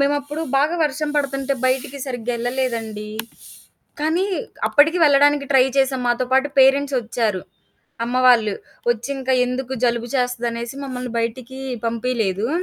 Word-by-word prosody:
మేమప్పుడు 290 +2 0 0.2
బాగా 300 +5 +2
వర్షం 300 +1 -2
పడుతుంటే 275 -1 0
బయటికి 260 +2 -1
సరిగ్గా 245 -2 -3
ఎళ్ళలేదండి. 230 -4 -3 0.9
కానీ, 320 +5 +1 0.4
అప్పటికి 315 +4 +4
వెళ్ళడానికి 290 0 +4
ట్రై 265 -2 +6
చేశాం. 265 -1 +2
మాతో 240 +1 +1
పాటు 265 +2 +3
పేరెంట్స్ 275 +1 +4
ఒచ్చారు, 220 -4 -1 0.6
అమ్మవాళ్ళు. 245 -4 +4 0.4
ఒచ్చింకా 260 +3 -2
ఎందుకు 255 +1 -3
జలుబు 240 0 0
చేస్తదనేసి 240 -1 -2
మమ్మల్ని 250 -2 -5
బయటికి 250 +3 -4 0.3
పంపియలేదు. 230 -3 -1
255 Hz, 115 wpm, -21 LUFS, 235-275 Hz, 0.9 s, ట్రై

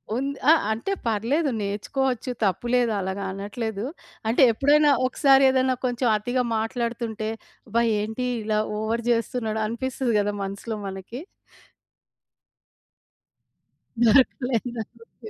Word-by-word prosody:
ఉంది. 275 +3 -2
ఆ! - - +9 0.2
అంటే, 225 - -2 0.2
పర్లేదు 235 +8 +1
నేర్చుకోవచ్చు. 250 +5 -2
తప్పులేదు. 240 +5 +1
అలాగా 190 +1 -3
అనట్లేదు. 205 +2 -4 0.4
అంటే 230 - +2
ఎప్పుడైనా 290 +5 +4 0.2
ఒకసారి 270 +1 +4
ఏదన్నా 260 0 +2
కొంచెం 245 0 0
అతిగా 245 +4 -1
మాట్లాడుతుంటే, 225 -1 -3 0.4
అబ్బా! 230 +2 +1 0.2
ఏంటి 220 +4 -3 0.2
ఇలా 215 0 0 0.2
ఓవర్ 225 +2 -1
జేస్తున్నాడు. 230 -1 0
అనిపిస్తది 245 +2 -2
గదా! 205 0 0
మనసులో 200 +3 -5
మనకి? 195 +7 -7 2.8
దొరకలేదా? 245 -1 +2 0.2
ఓకే. 230 -1 -13
230 Hz, 100 wpm, -24 LUFS, 215-255 Hz, 2.8 s, ఆ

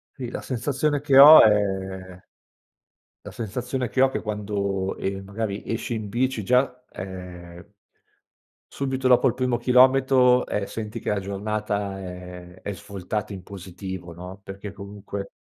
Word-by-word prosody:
Sì 125 -3 -6
la - - -6
sensazione 140 +3 -1
che 140 -2 +3
ho 150 +3 +11
è 95 -3 0 1.0
la - - -9
sensazione 125 +3 -3
che 130 - -1
ho 135 - +6
che - - -4
quando, 100 -2 -2
ehm, 95 0 -3
magari 100 0 -4
esci 115 +1 -3
in 110 -2 -4
bici 120 -1 -1
già, 125 +1 +1
ehm, 90 -2 -9 1.0
subito 130 -1 -2
dopo 125 +2 +5
il 120 - +1
primo 125 -2 0
chilometro, 125 0 +4
ehm, 105 - -2
senti 110 +2 -6
che - - -3
la 105 -1 0
giornata 100 0 -3
è 90 0 -10
è 100 - -4
svoltata 100 +1 -5
in 95 -2 -8
positivo 95 -2 -8
no, 90 +3 -10
perché 100 +1 -8
comunque 100 0 -8
105 Hz, 145 wpm, -24 LUFS, 95-125 Hz, 1.0 s, ho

